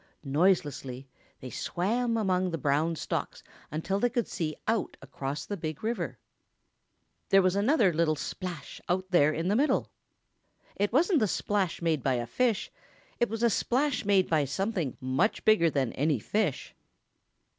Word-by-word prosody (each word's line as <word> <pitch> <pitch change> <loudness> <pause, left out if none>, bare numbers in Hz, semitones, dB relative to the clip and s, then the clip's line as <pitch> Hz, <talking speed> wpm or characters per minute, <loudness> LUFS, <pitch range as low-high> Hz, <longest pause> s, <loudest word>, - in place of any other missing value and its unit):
Noiselessly 140 -4 0 0.3
they 130 - -7
swam 230 - -1
among 185 -3 +1
the 165 - -2
brown 150 +4 +1
stalks - - -4 0.3
until 165 +6 -2
they 245 - +2
could 240 -1 -1
see 155 -4 -3
out 225 -1 0
across 140 +1 -5
the 205 - -4
Big 155 -3 -5
River. 180 - -2 1.1
There 195 -1 +6
was 185 0 +2
another 210 - +3
little 155 -1 +2
splash 175 -1 -6
out 185 +1 -1
there 155 -4 +5
in 165 +3 -2
the 200 - +2
middle. 285 +6 +1 0.8
It 205 +1 0
wasn't 325 - +3
the 215 - +2
splash 195 -3 -1
made 160 -4 +1
by 130 -1 +1
a 120 -1 -2
fish; 230 - 0 0.5
it 240 - +2
was 225 +2 -3
a 235 - +5
splash 270 +6 +1
made 200 -2 +3
by 155 -3 +2
something 180 - -2
much 130 - 0
bigger 210 -7 +5
than 135 -5 -1
any 145 0 +1
fish. 190 - -2
180 Hz, 155 wpm, -29 LUFS, 150-215 Hz, 1.1 s, There